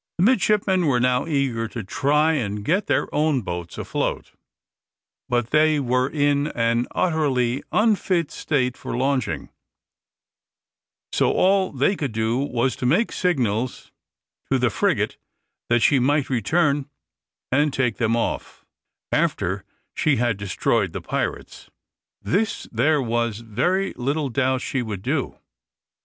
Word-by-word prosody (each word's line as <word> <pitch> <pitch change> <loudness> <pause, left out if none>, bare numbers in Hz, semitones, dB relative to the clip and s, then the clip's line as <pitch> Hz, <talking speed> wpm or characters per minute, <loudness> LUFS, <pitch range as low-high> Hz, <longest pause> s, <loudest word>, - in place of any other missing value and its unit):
The 175 - +2
midshipmen 200 -5 +3
were 125 -4 +2
now 125 +3 +1
eager 135 -7 0
to 115 0 -6
try 150 +9 +2
and 105 -7 -2
get 185 - +1
their - - +1
own 150 -4 +1
boats 85 -2 -5
afloat, - - -3 1.0
but 120 -1 0
they 155 0 +4
were 125 0 +1
in 145 -1 +1
an 115 +1 +1
utterly 140 -7 +1
unfit 195 -7 +1
state 125 -5 -1
for - - -5
launching, 130 - -1 1.6
so - - +2
all 190 0 +2
they 140 +9 +1
could 140 - -3
do 110 +2 0
was 130 -2 0
to 125 - -1
make 190 - +2
signals 125 - -1 0.6
to - - +4
the - - +1
frigate - - 0 0.5
that 120 0 +3
she 140 - +4
might 140 +2 +1
return 140 - +1 0.6
and 145 +3 +3
take 125 -5 0
them 115 -1 +1
off, 115 - -3 0.5
after - - 0 0.3
she 150 - +2
had 120 -2 +1
destroyed 100 -1 0
the - - -4
pirates. - - -4 0.5
This 205 +4 -1
there 140 +5 +2
was 115 -2 -1
very 180 - 0
little 140 +3 -1
doubt 130 0 0
she 130 - -2
would 105 -5 -5
do. 135 +2 -2
130 Hz, 135 wpm, -23 LUFS, 120-155 Hz, 1.6 s, they